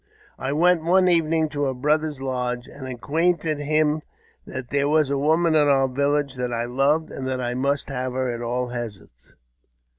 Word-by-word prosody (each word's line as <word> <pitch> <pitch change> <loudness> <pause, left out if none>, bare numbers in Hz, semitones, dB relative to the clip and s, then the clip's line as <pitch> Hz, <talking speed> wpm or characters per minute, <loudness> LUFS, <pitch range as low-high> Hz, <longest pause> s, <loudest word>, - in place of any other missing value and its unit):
I 135 - -2
went 170 +2 +3
one 185 +2 +4
evening 165 -2 +3
to 145 -1 -2
her 135 -1 -1
brother's 150 +2 0
lodge, 125 -2 -3
and 135 -2 -9
acquainted 155 +4 0
him 155 +1 +1 0.5
that 130 -1 -7
there 140 +1 +1
was 150 -2 +2
a 140 - +1
woman 160 +3 +2
in 150 -2 +4
our 135 -1 +4
village 140 +1 0
that 125 -1 -2
I 120 0 -1
loved, 140 +6 +1
and 130 - -5
that 130 -1 -2
I 120 -1 -2
must 140 +3 -1
have 130 -1 -3
her 130 0 -1
at 120 0 -5
all 125 +1 -2
hazards. 110 - -8
140 Hz, 185 wpm, -23 LUFS, 125-155 Hz, 0.5 s, one